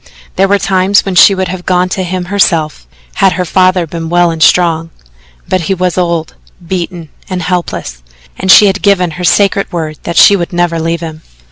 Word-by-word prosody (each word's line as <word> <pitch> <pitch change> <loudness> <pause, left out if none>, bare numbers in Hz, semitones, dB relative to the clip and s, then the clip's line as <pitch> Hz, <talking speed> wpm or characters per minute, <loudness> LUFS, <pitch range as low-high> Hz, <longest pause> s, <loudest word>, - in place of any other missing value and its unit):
There 195 +1 +2
were 200 +1 +2
times 195 0 +1
when 195 - -3
she 195 +2 +6
would 190 0 -3
have 185 -1 -6
gone 180 0 +1
to 190 - -3
him 180 0 -4
herself, 170 -5 -1 0.3
had 195 -1 +4
her 180 - -2
father 185 0 +1
been 165 0 -6
well 175 0 +2
and 165 -1 -6
strong, 165 -1 +2 0.6
but 185 0 -1
he 190 +4 -2
was 180 -1 -1
old, 170 -3 -2 0.3
beaten 175 -2 -5 0.2
and 185 -2 -4
helpless, 160 - -4 0.3
and 190 - -5
she 210 - +8
had 195 0 0
given 185 -4 +1
her 180 +3 -7
sacred 195 +2 +1
word 155 -3 -5
that 170 - -5
she 200 - +7
would 175 -2 -4
never 175 -1 0
leave 165 +1 -2
him. 160 -1 -8
180 Hz, 200 wpm, -11 LUFS, 165-190 Hz, 0.6 s, she